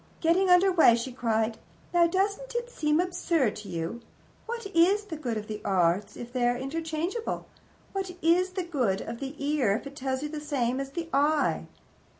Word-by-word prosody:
Getting 355 +3 +3
under 360 +2 +6
way, 320 -10 +6
she 235 +2 -3
cried: 225 -2 0 0.3
"Now, 345 -1 +5
doesn't 400 +8 -1
it 480 0 -2
seem 300 -6 +1
absurd 335 - +1
to 210 - -9
you? 170 +8 -4 0.5
What 470 -1 -4
is 380 +5 +5
the 390 -6 -6
good 250 -7 -3
of 210 - -4
the 215 0 -6
Arts 185 +1 +1
if 240 0 -8
they 245 -2 +2
are 245 0 +1
interchangeable? 325 - -3 0.5
What 385 -1 -2
is 360 +3 +3
the 370 -1 -2
good 255 - 0
of 235 - -6
the 275 +1 -5
ear 280 -8 +1
if - - -5
it 280 0 -8
tells 265 -1 -2
you 300 - -3
the 300 0 -5
same 265 -4 -1
as 275 0 -3
the 330 +4 -5
eye? 295 +2 +2
295 Hz, 190 wpm, -28 LUFS, 240-355 Hz, 0.5 s, under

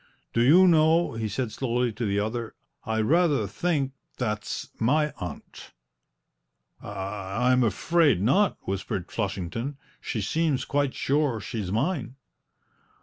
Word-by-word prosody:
"Do 115 - +2
you 170 +10 +7
know," 165 0 +4
he 115 -1 -2
said 110 +2 -2
slowly 120 0 -1
to 115 +2 -3
the 100 0 +1
other, 110 +2 -3 0.3
"I 110 0 0
rather 150 -1 +3
think 140 - -1 0.3
that's 105 -4 -3
my 150 +6 +2
aunt!" 90 - -8 1.1
"I 100 +4 -2
I'm 125 0 +4
afraid 145 - +3
not," 185 - +3
whispered 95 -1 -4
Flushington; 115 +6 -3 0.2
"she 115 - -4
seems 150 +6 0
quite 140 -2 0
sure 140 -4 +1
she's 105 -3 -4
mine." 125 - -1
120 Hz, 125 wpm, -26 LUFS, 105-145 Hz, 1.1 s, you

